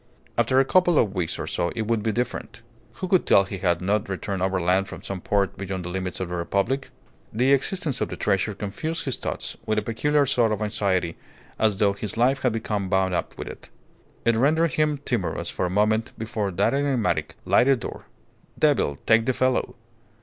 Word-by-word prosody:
After 120 +3 +3
a 135 - +4
couple 175 +1 +4
of 105 - +3
weeks 85 -3 -2
or - - -4
so 85 - -1
it 115 - -1
would 110 0 0
be 110 +1 0
different. 120 0 -4 0.3
Who 185 - -5
could 185 -1 +3
tell 100 - +6
he 95 0 -6
had 85 -2 +1
not 100 +1 0
returned 95 0 -3
overland 95 0 +1
from - - -9
some 95 -2 -5
port 100 0 0
beyond 95 -2 -4
the - - -4
limits 95 0 -3
of 95 -2 -3
the - - -5
Republic? 100 +10 -1 0.4
The 125 +5 +3
existence 145 +1 0
of - - 0
the - - -5
treasure 95 +2 0
confused 155 +12 -4
his 135 - -1
thoughts - - -4
with 110 - +1
a 105 - +1
peculiar 145 +5 +1
sort 120 -4 +2
of 105 - -4
anxiety, 95 -5 0 0.4
as 110 -3 +2
though 100 -1 +3
his 100 +1 -4
life 130 +3 +3
had 125 - +2
become 105 -3 -2
bound 95 -1 +2
up - - -3
with - - -6
it. - - -10 0.6
It 115 -1 +4
rendered 155 +7 +3
him 150 +1 +1
timorous - - -2
for 90 - -1
a - - -3
moment 110 +4 +1
before 110 -2 -2
that 95 +7 +1
enigmatic, 140 -5 0
lighted 130 -1 +4
door. - - -7 0.5
Devil 70 - +2
take 115 +1 +4
the 130 - +3
fellow! 130 +1 0
110 Hz, 200 wpm, -24 LUFS, 95-130 Hz, 0.6 s, tell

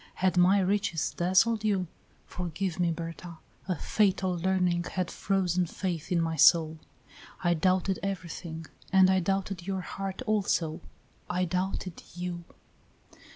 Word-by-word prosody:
Had 185 0 +1
my 180 +3 +5
riches 190 -4 0
dazzled 195 +5 +3
you? 200 -4 +1 0.4
Forgive 180 +1 -4
me, 175 -1 +2
Berta. 165 +1 -6 0.3
A 185 - 0
fatal 190 0 +1
learning 180 -1 +1
had 185 -2 -1
frozen 185 -2 0
faith 180 0 -4
in 175 - +3
my 165 -1 0
soul; 160 0 +5 0.6
I 175 -1 +3
doubted 185 +3 +1
everything, 170 -4 -5 0.3
and 190 -1 +6
I 190 - +3
doubted 195 0 -2
your 190 -1 -1
heart 195 +1 -5
also 185 -6 0 0.5
I 180 +1 0
doubted 185 0 -3
you." 175 -1 -4
180 Hz, 130 wpm, -29 LUFS, 170-190 Hz, 0.6 s, and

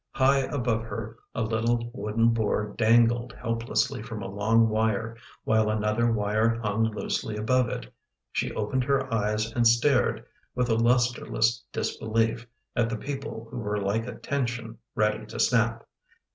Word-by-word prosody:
High 135 +1 +4
above 125 -4 -1
her 115 +1 -6 0.2
a 115 - 0
little 115 +2 0
wooden 115 -1 +1
board 105 -2 0
dangled 120 +1 +3
helplessly 115 +2 -1
from 115 -2 -6
a - - -4
long 110 +4 +3
wire, 110 +1 0 0.3
while 110 -1 +2
another 110 +2 +1
wire 110 +2 +1
hung 110 0 +1
loosely 105 0 -2
above 125 +3 +2
it. - - -6 0.4
She - - -1
opened 120 +5 -1
her 135 -2 0
eyes 105 0 0
and 120 -1 +4
stared, 120 -1 +3 0.3
with 125 -1 +1
a - - +4
lustreless 120 0 +2
disbelief, 115 +1 -1 0.3
at 115 -1 +2
the 115 - -2
people 135 -3 -6
who - - -5
were 105 -2 -2
like 105 +4 -1
a - - -6
tension 120 -4 -3 0.2
ready 105 0 +1
to - - -7
snap. 115 -1 +2
115 Hz, 150 wpm, -27 LUFS, 110-120 Hz, 0.4 s, High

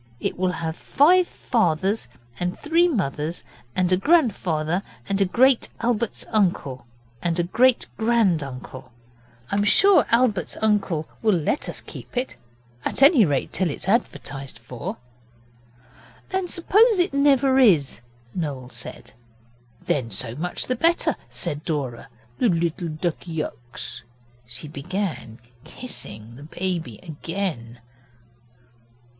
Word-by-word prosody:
It - - -2
will 180 0 0
have 160 -1 -3
five 350 - +4
fathers 195 - 0 0.3
and 180 +1 -2
three 330 +3 +3
mothers, 165 - -2 0.3
and 185 -1 +2
a 185 - +5
grandfather 185 - +2 0.3
and 200 0 0
a - - +5
great 250 +6 +3
Albert's 235 -1 -1
uncle, 170 - 0 0.3
and 170 -1 0
a - - +3
great 240 +8 +3
grand 220 -8 +3
uncle. 130 -1 -8 0.6
I'm 200 0 +2
sure 385 - +5
Albert's 230 -6 +2
uncle 195 -7 +1
will 215 -3 +3
let 170 - -1
us - - -5
keep - - -10
it 255 +1 -2 0.5
at - - +1
any 275 - +7
rate 145 -4 -1
till 185 -3 +1
it's 145 - -6
advertised 145 - -1
for.' 125 -2 -6 1.3
'And 375 -1 -1
suppose 420 +6 +4
it 355 -2 +1
never 275 -1 +4
is,' 165 - +4 0.3
Noel 140 -7 -4
said. 120 - -8 0.7
'Then 125 -5 0
so 115 +3 -3
much 170 +7 -2
the 255 - 0
better,' 335 +7 +2
said 150 -3 -2
Dora, 135 -7 -3 0.3
'the 240 - +4
little 170 0 0
Duckyux.' 155 -7 -5 0.5
She 120 +5 -7
began 150 - -4 0.3
kissing 115 - -7
the 140 - -11
baby 170 - -2
again. 160 - -5
180 Hz, 125 wpm, -24 LUFS, 150-235 Hz, 1.3 s, any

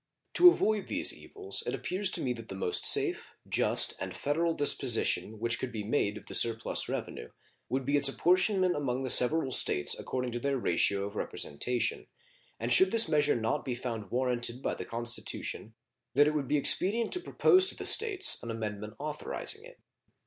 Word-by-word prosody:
To 355 +1 +8
avoid 215 - -1
these - - +3
evils 400 -1 -5
it - - -2
appears 190 +2 -1
to - - -3
me 125 - -1
that 115 -2 -11
the 95 - -7
most 90 -2 -1
safe, - - +3 0.2
just, - - +3
and - - -6
federal 165 +3 -1
disposition 120 -5 +1
which 115 +2 -2
could 130 - -5
be 110 -3 -6
made 105 -2 -1
of - - -13
the - - -10
surplus 115 -1 +2
revenue - - -6 0.4
would 130 0 -3
be 140 +2 +1
its 140 -1 +3
apportionment 185 +4 +1
among 135 -3 -3
the 130 - +2
several 135 +2 +2
States 75 - +2
according 125 -1 -4
to 120 - -5
their 140 +2 -2
ratio 100 -2 0
of 100 +1 -9
representation, 120 +8 -3 0.5
and 120 +2 0
should 190 +10 +5
this 230 0 +5
measure 150 -2 +1
not 115 +5 -2
be 125 -3 -4
found 115 -5 -6
warranted 125 0 -2
by - - -2
the - - -7
Constitution 115 -1 -3 0.4
that 145 +2 +5
it 150 - 0
would 145 -3 -3
be 150 - +1
expedient 210 +10 +2
to 360 - +2
propose 370 +1 +3
to - - -1
the - - -7
States 415 -4 +4
an 115 - -8
amendment 105 -1 -6
authorizing 155 - -6
it. - - -15
130 Hz, 185 wpm, -29 LUFS, 115-175 Hz, 0.5 s, To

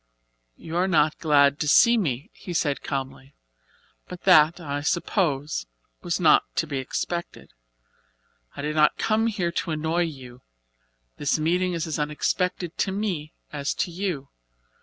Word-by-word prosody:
"You 165 - -8
are 185 +2 +2
not 155 -4 +2
glad 145 -2 +4
to 150 - -1
see 235 +10 +6
me," 155 - -2
he 175 - -8
said 145 -3 0
calmly, 135 0 -5 0.7
"but 180 -1 -9
that, 165 -2 +6
I 145 -3 -4
suppose, 150 - -1 0.3
was - - -2
not - - +6
to - - +1
be 135 - -3
expected. 170 +6 -5 1.0
I - - -6
did 150 +1 -2
not 150 -1 +4
come 225 +1 +1
here 190 -6 -1
to 170 - -3
annoy 160 +2 0
you. 130 -5 -9 0.8
This 145 +2 0
meeting 180 +4 +1
is 165 0 -2
as 155 -2 -3
unexpected 165 +3 -2
to 195 - +1
me 190 -7 -3 0.2
as 145 -1 -2
to 175 - -2
you. 170 -6 -3
155 Hz, 150 wpm, -25 LUFS, 145-180 Hz, 1.0 s, see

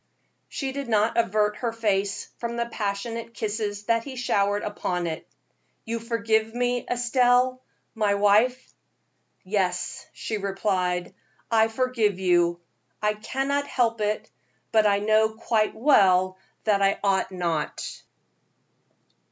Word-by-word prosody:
She 270 -2 -3
did 275 -2 -5
not 215 0 +2
avert 210 -2 +1
her 235 -2 -2
face 200 -3 -1
from 235 0 -3
the 235 0 0
passionate 230 +1 -4
kisses 210 -1 -3
that 230 +1 +1
he 265 +1 -8
showered 205 -4 +1
upon 180 -4 -2
it. 160 -1 -5 0.6
"You 230 0 -2
forgive 225 -1 0
me, 245 0 0
Estelle, 245 +1 +2 0.3
my 210 -3 +1
wife?" 215 +6 +2 0.7
"Yes," 185 -2 -2
she 220 - -4
replied, 190 -3 -1 0.4
"I 220 -1 +5
forgive 225 -4 0
you; 175 -2 +2 0.4
I 210 0 +1
cannot 270 +6 -2
help 230 -4 0
it; 210 0 -1 0.4
but 215 -1 +4
I 200 -1 +3
know 215 +1 +3
quite 220 -1 0
well 185 -8 +4 0.2
that 205 -2 +2
I 195 0 +3
ought 195 -1 +1
not." 170 -4 -3
215 Hz, 125 wpm, -25 LUFS, 200-235 Hz, 0.7 s, I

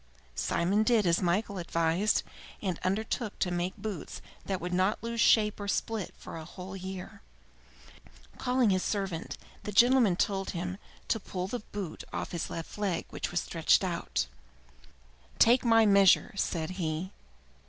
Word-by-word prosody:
Simon 180 - +1
did 220 -2 +3
as 170 +1 +3
Michael 190 +2 0
advised, 170 +4 +1 0.4
and 185 -5 -2
undertook 210 +3 -1
to 180 - 0
make 175 +2 -2
boots 205 -4 -5 0.3
that 190 -2 -1
would 180 +1 -4
not 185 +4 +2
lose 230 0 -1
shape 210 -1 +4
or 205 - -4
split 215 -1 -1
for - - -8
a 160 - -7
whole 180 +3 -9
year. 190 -1 -7 1.2
Calling 250 -3 +2
his 185 -1 +2
servant, 195 -6 -3 0.2
the 210 - -5
gentleman 235 -2 +5
told 195 +1 0
him 180 +3 -4 0.3
to 225 - +1
pull 185 -2 -4
the 245 +5 -3
boot 195 -6 -5
off - - -4
his 170 - -3
left 165 +5 -7
leg, 195 -5 -1
which - - -3
he - - -9
stretched - - +2
out. - - -1 1.1
"Take 240 +2 +6
my 225 -2 +5
measure!" 200 -2 +5
said 165 -3 -1
he. 175 0 -3
195 Hz, 155 wpm, -30 LUFS, 180-215 Hz, 1.2 s, Take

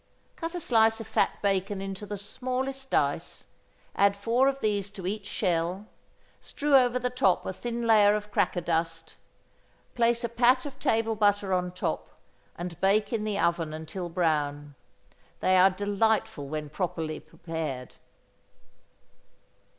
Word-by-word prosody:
Cut 330 +2 -5
a - - -2
slice 225 -6 +3
of 225 - -6
fat 220 - 0
bacon 195 0 0
into 195 +1 -6
the 205 - -4
smallest 260 +5 -4
dice, - - -1 0.5
add 200 0 +4
four 235 +6 +2
of 275 0 0
these 205 -4 0
to 195 -3 -9
each 205 +2 -3
shell, 180 0 -1 0.5
strew 290 -1 0
over 250 -2 +5
the 250 0 -2
top 245 -8 +2
a 190 - -3
thin 235 +3 -4
layer 210 -2 +6
of 210 0 -5
cracker 175 - +1
dust, 165 -1 -2 0.8
place 235 0 +2
a 235 - -1
pat 250 +3 +3
of 275 -1 -8
table 225 0 +1
butter 205 -2 +2
on 180 -1 0
top, 180 - -3 0.5
and 175 -1 -6
bake 205 +3 +2
in 220 -2 0
the 210 -2 -1
oven 170 -4 0
until 165 +3 -6
brown. 150 -4 -1 0.7
They 185 - +3
are 185 +1 +7
delightful 205 -5 0
when 150 -1 -4
properly 160 -3 -3
prepared. 155 -7 -6
200 Hz, 145 wpm, -28 LUFS, 175-230 Hz, 0.8 s, are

